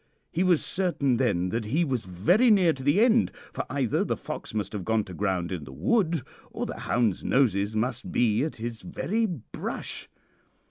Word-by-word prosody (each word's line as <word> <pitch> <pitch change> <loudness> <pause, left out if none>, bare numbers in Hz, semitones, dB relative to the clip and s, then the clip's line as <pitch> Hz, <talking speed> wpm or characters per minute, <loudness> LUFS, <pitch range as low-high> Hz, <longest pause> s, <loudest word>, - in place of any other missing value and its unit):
He 175 - +1
was 180 -4 +3
certain 170 -9 +1
then 95 -8 +1
that 115 +2 -2
he 150 +11 +1
was 130 - -2
very 115 - +3
near 185 -6 +5
to 135 - -9
the 145 +10 +3
end, 235 -1 +4 0.2
for - - -3
either 130 -4 +1
the - - -1
fox - - -6
must 105 0 -3
have 100 -3 -3
gone 110 +1 +1
to 95 - -10
ground 95 -2 -1
in 90 -5 -4
the 65 - -10
wood 160 - +1 0.3
or - - -4
the - - -6
hounds' 115 -6 0
noses 110 -5 +2
must 120 +3 -2
be 115 0 +2
at 155 - -3
his 115 0 -5
very 220 +10 -1
brush. 160 - -5
120 Hz, 190 wpm, -27 LUFS, 105-170 Hz, 0.3 s, near